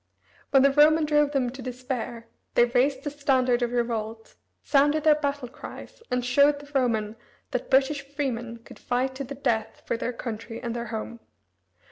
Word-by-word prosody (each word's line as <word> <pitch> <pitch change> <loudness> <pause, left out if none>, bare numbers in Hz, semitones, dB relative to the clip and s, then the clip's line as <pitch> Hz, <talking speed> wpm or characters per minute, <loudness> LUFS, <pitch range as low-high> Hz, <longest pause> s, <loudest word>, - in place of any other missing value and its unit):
When 270 -1 +5
the 275 - +5
Roman 305 +2 +5
drove 295 -1 +3
them 260 -4 0
to 265 +1 -9
despair 250 -2 -5 0.3
they 240 - +6
raised 260 +3 +1
the 290 - -3
standard 260 -4 +2
of 240 -1 0
revolt, 225 -2 -3 0.3
sounded 290 +2 +3
their 310 -1 +7
battle 285 -3 -2
cries, 255 - -11
and 250 -1 -1
showed 280 +4 +4
the 285 0 -13
Roman 225 -5 0 0.4
that 250 - -3
British 275 +2 +3
freemen 255 -5 -4
could - - -14
fight 255 +2 -1
to 270 +1 -5
the 280 +2 -7
death 225 -5 -2
for 235 - -1
their 240 - -2
country 230 -1 -6
and 235 -2 -4
their 235 0 -4
home. 225 +1 -5
255 Hz, 175 wpm, -26 LUFS, 235-280 Hz, 0.4 s, their